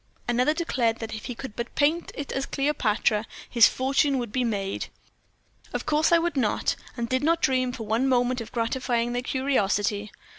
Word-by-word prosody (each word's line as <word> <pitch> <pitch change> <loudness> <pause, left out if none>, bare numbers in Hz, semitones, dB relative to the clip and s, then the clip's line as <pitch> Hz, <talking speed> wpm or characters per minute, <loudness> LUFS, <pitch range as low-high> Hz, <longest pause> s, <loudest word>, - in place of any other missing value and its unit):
Another 250 +5 +2
declared 245 -9 0
that 225 -1 -6
if 215 - -6
he 245 - -5
could 245 -3 -8
but 235 +1 -5
paint 310 +4 +1
it 285 - -5
as 270 0 -2
Cleopatra, 225 -6 +1 0.2
his 235 -3 +6
fortune 270 +2 +1
would 240 -4 -3
be 255 +3 0
made. 200 -4 -2 0.9
Of - - -3
course 305 +2 +2
I 340 - +7
would 340 0 -1
not, 235 -6 +1 0.2
and 235 -1 -2
did 255 +2 0
not 330 +2 +3
dream 255 -4 +1
for 240 -2 -6
one 230 +5 +1
moment 250 -1 +2
of 225 - -8
gratifying 240 0 -1
their 245 - -1
curiosity. 210 -6 0
250 Hz, 185 wpm, -26 LUFS, 225-275 Hz, 0.9 s, I